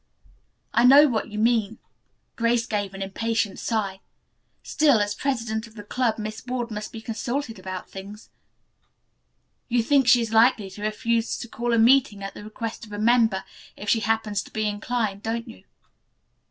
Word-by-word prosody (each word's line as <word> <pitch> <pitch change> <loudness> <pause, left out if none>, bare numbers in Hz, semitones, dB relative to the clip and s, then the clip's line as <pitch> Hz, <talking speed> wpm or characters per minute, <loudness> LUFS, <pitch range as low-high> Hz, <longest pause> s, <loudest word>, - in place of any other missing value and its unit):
"I 235 - +4
know 280 +4 +8
what 230 -5 -2
you 210 - -7
mean." 225 -1 +1 0.6
Grace 230 0 +1
gave 205 -4 -3
an 195 - -4
impatient 225 +2 -2
sigh. 200 -4 -2 0.6
"Still, 290 -7 +3
as 205 0 0
president 230 -3 -2
of 220 - -19
the 205 - -8
club 235 +1 0
Miss 215 0 -6
Ward 245 -2 -3
must 215 0 -5
be 225 - -8
consulted 230 +1 -4
about 185 0 -6
things. 200 +2 -10 1.4
You 240 -1 +2
think 275 0 +3
she 245 0 +6
is 225 -1 -3
likely 225 -3 +4
to 205 - -10
refuse 225 +2 -1
to 235 - -7
call 240 +1 -3
a 230 - +3
meeting 230 -3 +4
at 195 - -5
the - - -10
request 220 +2 -6
of 215 - -11
a 205 - -5
member, 225 -3 +3 0.3
if 210 - -5
she 225 - +4
happens 220 -2 0
to - - -14
be 215 - -2
so 210 - +1
inclined, 210 -1 -2
don't 230 +1 -3
you?" 95 - -13
225 Hz, 180 wpm, -24 LUFS, 210-235 Hz, 1.4 s, know